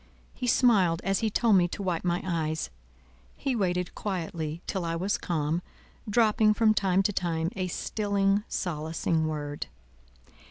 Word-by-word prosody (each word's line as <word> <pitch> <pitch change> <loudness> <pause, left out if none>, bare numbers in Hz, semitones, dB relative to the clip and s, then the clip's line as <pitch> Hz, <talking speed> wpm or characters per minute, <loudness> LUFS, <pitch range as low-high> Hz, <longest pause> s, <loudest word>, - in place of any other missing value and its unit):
He 250 - -4
smiled 200 -10 +4
as 195 0 +1
he 220 - +1
told 215 -1 +4
me 175 -1 +4
to 200 - -6
wipe 175 -3 -1
my 175 -1 0
eyes; 160 - -2 0.7
he 270 -3 -1
waited 180 -4 -1
quietly 170 -4 -4
till 190 -3 -2
I 165 0 -1
was 190 +4 0
calm, 160 0 -1 0.5
dropping 215 -1 +4
from 215 0 +4
time 195 -2 +2
to 205 - 0
time 165 -2 -1
a 185 -2 -1
stilling, 200 +1 0
solacing 160 -1 -1
word. 145 -2 -4
180 Hz, 150 wpm, -28 LUFS, 165-205 Hz, 0.7 s, smiled